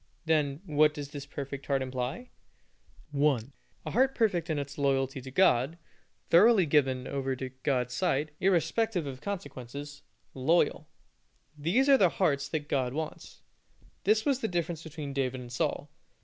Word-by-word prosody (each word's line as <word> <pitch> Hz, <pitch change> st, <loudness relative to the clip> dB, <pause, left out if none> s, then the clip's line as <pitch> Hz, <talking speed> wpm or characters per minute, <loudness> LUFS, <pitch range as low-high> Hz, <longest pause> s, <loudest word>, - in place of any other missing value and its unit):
Then, 150 Hz, -2 st, +1 dB
what 150 Hz, -2 st, +3 dB
does 145 Hz, -2 st, -6 dB
this 145 Hz, -2 st, -8 dB
perfect 140 Hz, -1 st, -6 dB
heart 135 Hz, -2 st, +1 dB
imply? 130 Hz, -, -4 dB, 0.8 s
1. 140 Hz, -3 st, +1 dB, 0.3 s
A -, -, -4 dB
heart 265 Hz, +3 st, +2 dB
perfect 185 Hz, -7 st, +1 dB
in 155 Hz, -, 0 dB
its 140 Hz, 0 st, -5 dB
loyalty 135 Hz, -1 st, +1 dB
to 130 Hz, -, -9 dB
God, 140 Hz, -1 st, +3 dB, 0.5 s
thoroughly 200 Hz, +2 st, +6 dB
given 135 Hz, -4 st, +2 dB
over 135 Hz, -1 st, -2 dB
to 130 Hz, 0 st, -5 dB
God's 125 Hz, -3 st, 0 dB
side, 150 Hz, -1 st, 0 dB
irrespective 185 Hz, +1 st, +1 dB
of 130 Hz, -2 st, -7 dB
consequences, 145 Hz, -6 st, -6 dB, 0.3 s
loyal. 150 Hz, +7 st, +1 dB, 0.7 s
These 175 Hz, -, +1 dB
are 275 Hz, -1 st, +6 dB
the 185 Hz, -, +5 dB
hearts 140 Hz, -6 st, 0 dB
that 150 Hz, -2 st, -3 dB
God 130 Hz, -3 st, 0 dB
wants. 155 Hz, 0 st, -6 dB, 0.6 s
This 215 Hz, +2 st, +3 dB
was 275 Hz, -3 st, +2 dB
the 225 Hz, -, -1 dB
difference 170 Hz, -3 st, -2 dB
between 155 Hz, -3 st, -7 dB
David 130 Hz, -2 st, -1 dB
and 120 Hz, -1 st, -9 dB
Saul. -, -, -2 dB
145 Hz, 150 wpm, -29 LUFS, 135-175 Hz, 0.8 s, thoroughly